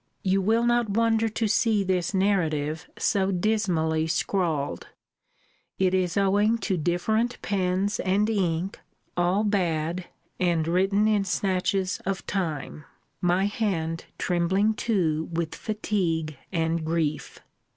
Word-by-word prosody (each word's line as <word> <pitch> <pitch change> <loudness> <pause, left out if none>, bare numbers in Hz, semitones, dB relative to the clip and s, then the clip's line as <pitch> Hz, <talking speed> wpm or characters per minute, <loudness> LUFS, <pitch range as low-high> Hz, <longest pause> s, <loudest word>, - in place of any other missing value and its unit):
You 195 0 +2
will 225 +4 +2
not 240 -2 +2
wonder 225 +1 +2
to 220 +1 -1
see 215 0 +2
this 185 -2 0
narrative 165 -5 0
so 195 -1 +1
dismally 175 -5 +1
scrawled. 160 -3 -1 0.9
It 190 -1 +2
is 185 -2 +1
owing 205 +3 +3
to 195 - +1
different 200 +9 0
pens 190 +1 0
and 195 +3 +2
ink, 185 -3 -1 0.4
all 180 +4 +2
bad, 175 -4 0 0.3
and 170 -3 +1
written 195 +4 +2
in 210 -2 +2
snatches 190 0 0
of 195 0 -3
time; 155 -6 -3 0.4
my 180 +2 +2
hand 175 -6 -2
trembling 190 +5 +1
too 170 -9 0
with 165 -1 -2
fatigue 175 -8 -2 0.2
and 165 -2 0
grief. 160 -2 -2
185 Hz, 120 wpm, -26 LUFS, 165-205 Hz, 0.9 s, owing